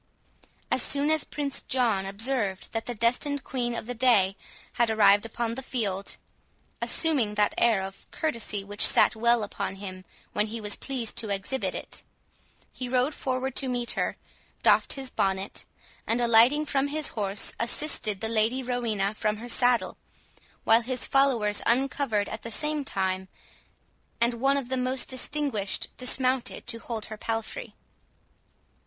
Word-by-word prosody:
As - - +4
soon 285 +2 +3
as 315 -1 +1
Prince 285 -2 -3
John 225 -7 0
observed 205 -1 -1
that 225 0 -4
the 245 - -3
destined 250 +5 0
Queen 240 -2 -2
of - - -4
the 245 - -4
day 220 -6 +3 0.4
had 235 -1 +2
arrived 205 0 +5
upon 230 0 -3
the 265 - -5
field, 205 -7 -2 0.6
assuming 270 -11 +2
that 210 0 +2
air 225 -5 +3
of 195 0 -9
courtesy 230 -9 -3
which 205 +1 0
sat - - +6
well 235 0 +2
upon 200 -1 -4
him 185 -1 -8 0.3
when 210 +1 +1
he 230 +2 -5
was 210 -1 +1
pleased 250 -5 -3
to 225 -3 -1
exhibit 200 +7 -2
it, - - -6 0.7
he 250 -1 -5
rode 255 +4 +1
forward 260 -1 -3
to 265 - +2
meet 245 -1 -2
her, - - -2 0.5
doffed - - +5
his 270 -2 -4
bonnet, 190 0 -2 0.4
and, 230 +2 +1
alighting 240 +6 +5
from 280 -1 0
his 300 +1 0
horse, 200 -2 +1
assisted 230 -5 0
the 220 - 0
Lady 230 +4 +1
Rowena 225 -5 -1
from 215 0 -1
her 235 +3 -8
saddle, 245 0 +2 0.7
while 225 +1 +5
his 250 +2 -1
followers 240 -7 +2
uncovered 240 -4 +1
at 220 - -6
the 230 - -7
same 300 +5 -1
time, 190 -5 -2 0.9
and 235 +1 +2
one 275 +1 +3
of 265 -3 -4
the 260 - -1
most 255 +1 0
distinguished 260 -6 -2
dismounted 255 0 +1
to 230 - -3
hold 225 -2 -5
her 215 - -8
palfrey. 225 - -4
235 Hz, 155 wpm, -27 LUFS, 210-260 Hz, 0.9 s, sat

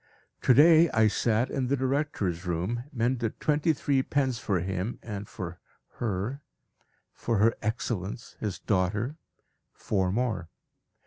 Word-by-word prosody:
_ - - -43
To 125 - +5
day 160 +3 +7
I 110 -1 +4
sat 115 +3 +1
in 130 -3 -1
the 140 +2 +1
director's 130 - -1
room, 95 +9 -2
mended 120 -3 -1
twenty 150 +2 +2
three 140 -2 +1
pens 130 -3 0
for 100 -5 0
him, 95 +5 -3
and 105 -2 -6
for 90 -1 -6 0.4
Her 115 +5 -2 0.7
for 115 -2 -1
Her 110 +3 +4
Excellence, 110 -1 -3
his 100 -5 -3
daughter, 105 - 0 0.6
four 95 -3 0
more. 105 -6 -1
115 Hz, 135 wpm, -28 LUFS, 95-130 Hz, 0.7 s, day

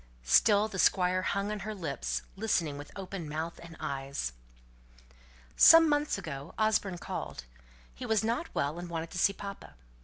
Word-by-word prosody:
Still 205 - +4
the 200 -3 -6
Squire 185 0 +3
hung 200 +2 -1
on 210 - -3
her 210 +3 -5
lips, 65 - -3
listening 185 -8 0
with 145 +1 -9
open 185 -4 -6
mouth 160 +2 -4
and 165 -1 -11
eyes. 135 - -4 1.2
"Some 330 0 +9
months 295 -3 +1
ago 145 -7 -7
Osborne 215 -4 +1
called. - - -6 0.5
He - - -7
was 220 -2 +2
not 235 +9 -1
well, 145 +4 -1
and 175 0 -7
wanted 165 -1 -4
to 180 - -4
see 200 - +4
papa. 200 0 -9
180 Hz, 160 wpm, -30 LUFS, 150-210 Hz, 1.2 s, Some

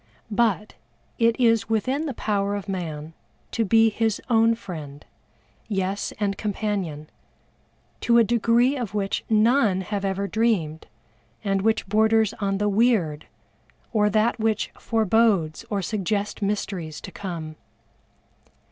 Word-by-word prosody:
But, 210 -1 +1 0.5
it 230 +1 +3
is 230 -3 +3
within 260 +8 0
the 270 - -4
power 200 -2 -1
of 200 0 -5
man 165 -5 -5 0.4
to 230 - 0
be 225 +1 +4
his 220 0 0
own 230 0 +4
friend, 150 -9 -9 0.6
yes, 195 -1 -2
and 200 -2 -1
companion, 195 -8 -3 0.9
to 235 0 +3
a 235 - +7
degree 235 +4 +3
of 230 -6 -4
which 195 -1 -1
none 220 -3 +3
have 200 +1 -3
ever 195 0 -1
dreamed, 200 -9 0 0.6
and 195 -2 0
which 220 +2 +1
borders 220 +1 +3
on 195 -1 0
the 210 +1 0
weird, 200 -8 +1 0.7
or 210 -2 +3
that 215 +3 +1
which 220 -1 0
forebodes 220 -7 +1
or 200 -2 -1
suggests 205 +2 -2
mysteries 195 -6 -3
to - - -9
come. 165 -5 -6
210 Hz, 130 wpm, -24 LUFS, 190-225 Hz, 0.9 s, a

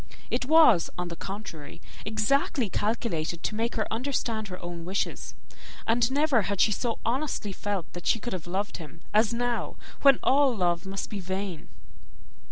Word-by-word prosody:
It 250 +1 0
was, 295 - +6
on 180 0 -3
the 170 - -5
contrary, 190 -6 -7 0.3
exactly 220 - +1
calculated 175 -6 -1
to - - -1
make 230 +2 -1
her 220 - +1
understand 230 -3 -1
her 180 -1 -7
own 175 -1 -6
wishes; 190 +3 -3 0.5
and 230 +2 +2
never 285 -4 +3
had 200 0 -2
she 215 - +5
so 230 +3 -1
honestly 245 -3 -1
felt 195 -2 -2
that 175 - -7
she - - +4
could 240 +1 -5
have 180 -2 -5
loved 195 +4 -2
him, 165 -1 -11
as 215 +1 +4
now, 240 0 -1 0.3
when 275 -2 +7
all 270 -2 +4
love 175 0 +1
must 195 0 -4
be 205 - -3
vain. 190 -2 -4
210 Hz, 170 wpm, -28 LUFS, 180-240 Hz, 0.5 s, when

